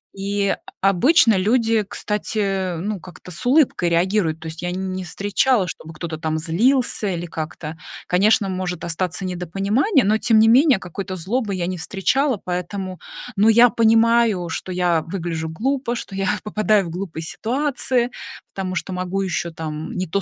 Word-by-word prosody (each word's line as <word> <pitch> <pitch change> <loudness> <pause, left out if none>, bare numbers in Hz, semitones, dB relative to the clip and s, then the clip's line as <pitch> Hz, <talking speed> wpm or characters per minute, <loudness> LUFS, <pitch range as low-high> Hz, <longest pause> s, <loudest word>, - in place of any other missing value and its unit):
И 200 0 0 0.3
обычно 225 - +5
люди, 225 +2 +2
кстати, 195 -4 -2
ну, 200 +4 -3
как-то 180 +1 -12
с 160 - -5
улыбкой 255 - +3
реагируют. 170 -1 +1
То 160 - -7
есть 160 0 -7
я 175 - -2
не 185 0 -3
встречала, 200 +4 +1
чтобы 160 -1 -8
кто-то 160 -1 -5
там 160 0 -1
злился 215 - +1
или 175 -3 -2
как-то. 160 -1 -6 0.3
Конечно, 200 +3 +3
может 185 -2 -3
остаться 180 +2 -2
недопонимание, 195 - +1
но 215 +2 +2
тем 225 -1 +3
не 220 +1 +6
менее 265 +3 +6
какой-то 190 +1 -6
злобы 200 +4 -2
я 180 -2 -2
не 180 0 -4
встречала, 230 - 0
поэтому 185 +1 -4 0.4
но 210 +3 +4
я 235 +2 +7
понимаю, 225 -4 +3
что 185 - -5
я 175 -2 +1
выгляжу 165 -1 -4
глупо, 250 - -1
что 230 - -7
я 195 -1 0
попадаю 215 -1 +2
в - - -6
глупые 170 -2 -5
ситуации, 250 - 0 0.4
потому 190 -1 -4
что 185 - -3
могу 185 +2 -2
ещё 180 -2 -2
там 155 -1 -6
не 185 - -2
то 195 +5 -1
190 Hz, 160 wpm, -21 LUFS, 175-220 Hz, 0.4 s, я